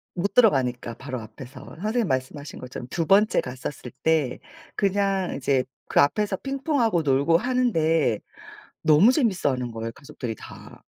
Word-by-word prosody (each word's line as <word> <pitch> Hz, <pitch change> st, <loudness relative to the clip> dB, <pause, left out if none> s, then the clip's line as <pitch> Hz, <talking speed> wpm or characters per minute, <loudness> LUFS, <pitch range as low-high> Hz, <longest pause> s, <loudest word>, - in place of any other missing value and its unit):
못 190 Hz, +3 st, -1 dB
들어가니까 130 Hz, -, +3 dB
바로 130 Hz, +1 st, -6 dB
앞에서 125 Hz, +4 st, -11 dB, 0.2 s
선생님이 225 Hz, +3 st, 0 dB
말씀하신 130 Hz, +2 st, -3 dB
것처럼. 125 Hz, -1 st, -8 dB
2번째 195 Hz, +6 st, +3 dB
갔었을 125 Hz, 0 st, -7 dB
때 155 Hz, -6 st, +2 dB, 0.4 s
그냥 195 Hz, -2 st, 0 dB
이제 135 Hz, -1 st, +1 dB, 0.3 s
그 -, -, +3 dB
앞에서 200 Hz, +7 st, +1 dB
핑퐁하고 270 Hz, -, 0 dB
놀고 145 Hz, +3 st, +3 dB
하는데 165 Hz, -, +1 dB, 0.6 s
너무 160 Hz, +9 st, +6 dB
재밌어하는 145 Hz, -, 0 dB
거예요 115 Hz, 0 st, -5 dB
가족들이 120 Hz, -5 st, -7 dB
다. -, -, -13 dB
155 Hz, 330 characters per minute, -25 LUFS, 130-205 Hz, 0.6 s, 너무